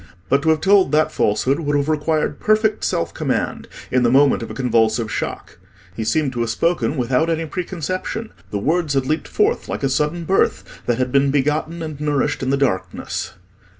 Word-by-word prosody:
But 140 +1 +3
to 160 - +1
have 160 -1 +3
told 195 0 +4
that 155 0 +3
falsehood 125 +7 +1
would 145 -2 -1
have 140 0 0
required 155 -1 0
perfect 215 0 +2
self 85 - -1
command - - -2 0.2
in 125 - +3
the 120 - +3
moment 135 +1 +4
of 115 - -6
a - - -7
convulsive 115 -3 +1
shock: - - -5 0.4
he 110 - -3
seemed 135 +4 0
to 120 - -4
have 115 -1 0
spoken 145 +1 0
without 125 +6 +1
any 165 0 0
preconception: 185 +5 -4 0.2
the 105 - -3
words 155 - 0
had 135 -1 +1
leaped 155 +4 -1
forth 425 +3 0
like - - -4
a 135 - +2
sudden 150 +5 0
birth 190 +4 +2 0.2
that 120 -1 +1
had 125 0 -1
been 140 +1 +3
begotten 150 +4 0
and 155 -2 -6
nourished 145 0 0
in 130 - -1
the 140 - +2
darkness. 130 -10 -2
145 Hz, 195 wpm, -20 LUFS, 130-165 Hz, 0.4 s, told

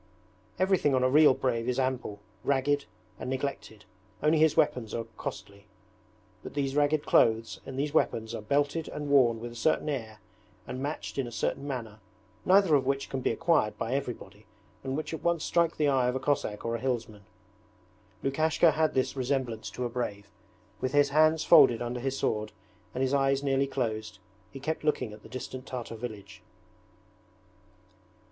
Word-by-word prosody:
Everything 185 -7 +2
on 130 - +2
a 130 - +4
real 150 -2 +6
brave 120 -2 -1
is 125 - -1
ample, 130 -6 -2 0.2
ragged, 140 +1 +1 0.3
and - - -5
neglected, 130 -5 -4 0.4
only 155 +1 +4
his 160 -1 +4
weapons 125 -8 +1
are 115 - -2
costly. 100 +1 -8 0.7
But - - -10
these 140 -1 -1
ragged 145 +1 +2
clothes 110 -1 +3
and 130 - -6
these 145 +1 -1
weapons 115 -7 0
are 115 - -4
belted 145 +7 0
and 150 -1 -5
worn 125 -5 +4
with 120 +1 -6
a - - -12
certain 150 +6 +1
air 110 -7 -4 0.5
and 130 - -6
matched 145 0 -4
in 130 - -1
a - - -8
certain 120 +5 -2
manner, 115 -6 -5 0.5
neither 190 -3 +5
of 135 -3 +3
which 135 0 -1
can 135 - -2
be - - +1
acquired 115 -3 +1
by 115 +2 -2
everybody 110 -7 -5 0.4
and 135 +1 -2
which 155 - -4
at 160 - -5
once 170 -2 +1
strike 170 -1 +1
the 150 - +2
eye 130 -3 +2
of 125 - 0
a - - 0
Cossack 130 -7 -1
or 115 0 -1
a - - -3
hillsman. 115 -5 -3 1.0
Lukashka 155 +4 +3
had 155 +1 0
this 130 +1 0
resemblance 130 -4 -2
to 125 - -4
a - - -2
brave. 100 -5 -4 0.5
With 130 +1 -2
his 145 -1 +4
hands 155 +2 +4
folded 125 -8 +7
under 120 +1 -3
his 135 +2 -2
sword, 105 -3 -1 0.4
and 130 - 0
his 130 +1 0
eyes 135 0 +2
nearly 135 0 +1
closed, 110 -5 -3 0.3
he 135 - -9
kept 155 +4 -3
looking 150 -8 0
at 105 - -12
the - - -14
distant 130 +1 -7
Tartar 125 -3 -5
village. 110 -3 -8
130 Hz, 180 wpm, -29 LUFS, 115-145 Hz, 1.0 s, folded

